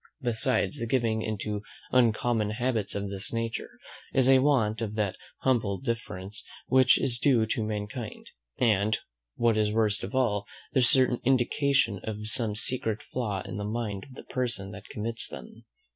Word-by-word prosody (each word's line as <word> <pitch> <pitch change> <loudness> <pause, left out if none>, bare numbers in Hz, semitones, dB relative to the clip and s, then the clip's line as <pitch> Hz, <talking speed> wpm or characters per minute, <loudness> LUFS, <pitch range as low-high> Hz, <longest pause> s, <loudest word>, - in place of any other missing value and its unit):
Besides, 115 -4 +1
the 115 - -2
giving 115 -3 +1
into 105 -1 -3 0.3
uncommon 115 -3 +3
habits 115 -2 -1
of 100 -1 -3
this 100 0 -2
nature 115 0 -3 0.4
is 130 -1 +4
a 135 0 +7
want 120 -6 +2
of 105 -2 -3
that 100 -4 0 0.3
humble 115 -7 +2
deference 105 -5 -4 0.2
which 130 -1 +5
is 120 -3 0
due 120 -6 +4
to 110 0 -1
mankind, 110 +2 -5 0.3
and, 110 -2 +3 0.4
what 115 -2 +2
is 105 -1 +2
worst 110 -1 +1
of 100 - -5
all, 105 -6 +1 0.3
the 130 - +4
certain 125 0 +4
indication 130 -3 +2
of 105 -1 -5
some 110 -2 +1
secret 110 -1 0
flaw 105 -7 -3
in 95 0 -6
the 105 - -3
mind 105 -2 -3
of 130 - -14
the - - -9
person 115 -7 -3
that 105 -1 -10
commits 115 +2 -4
them. 65 -2 -11
110 Hz, 160 wpm, -28 LUFS, 105-125 Hz, 0.4 s, a